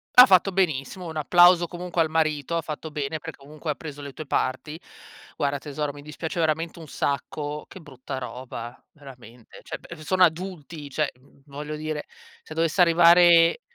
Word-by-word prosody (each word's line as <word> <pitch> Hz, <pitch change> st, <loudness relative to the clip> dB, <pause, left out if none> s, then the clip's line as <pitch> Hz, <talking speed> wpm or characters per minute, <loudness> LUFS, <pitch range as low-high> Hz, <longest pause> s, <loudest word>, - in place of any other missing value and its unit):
Ha 250 Hz, -, +11 dB
fatto 195 Hz, -3 st, +4 dB
benissimo, 180 Hz, -1 st, -1 dB
un 160 Hz, -, -6 dB
applauso 175 Hz, +3 st, +5 dB
comunque 175 Hz, 0 st, -3 dB
al 160 Hz, -, +1 dB
marito, 155 Hz, 0 st, 0 dB
ha -, -, 0 dB
fatto 155 Hz, +1 st, -6 dB
bene 150 Hz, +1 st, -4 dB
perché 140 Hz, -, -10 dB
comunque 155 Hz, +2 st, -8 dB
ha -, -, -4 dB
preso 145 Hz, -2 st, -9 dB
le 140 Hz, -1 st, -8 dB
tue 155 Hz, -, -8 dB
parti. 140 Hz, +4 st, -2 dB, 0.6 s
Guarda 140 Hz, -1 st, -1 dB
tesoro, 145 Hz, 0 st, -4 dB
mi 145 Hz, -, -11 dB
dispiace 155 Hz, +3 st, -6 dB
veramente 165 Hz, +1 st, -1 dB
un 160 Hz, -, -10 dB
sacco, 145 Hz, +1 st, -3 dB
che 190 Hz, -, -12 dB
brutta 135 Hz, -2 st, -8 dB
roba, 125 Hz, -2 st, -8 dB
veramente. 125 Hz, -5 st, -14 dB
Cioè -, -, -7 dB
b -, -, -12 dB
sono 185 Hz, +4 st, +2 dB
adulti, 165 Hz, -3 st, -2 dB
cioè, 150 Hz, +1 st, -1 dB
v 135 Hz, +1 st, -25 dB
voglio 150 Hz, +2 st, -6 dB
dire, 155 Hz, -1 st, -4 dB, 0.4 s
se 155 Hz, -, -11 dB
dovesse 165 Hz, +2 st, +1 dB
arrivare 170 Hz, -, +6 dB
155 Hz, 175 wpm, -25 LUFS, 145-170 Hz, 0.6 s, Ha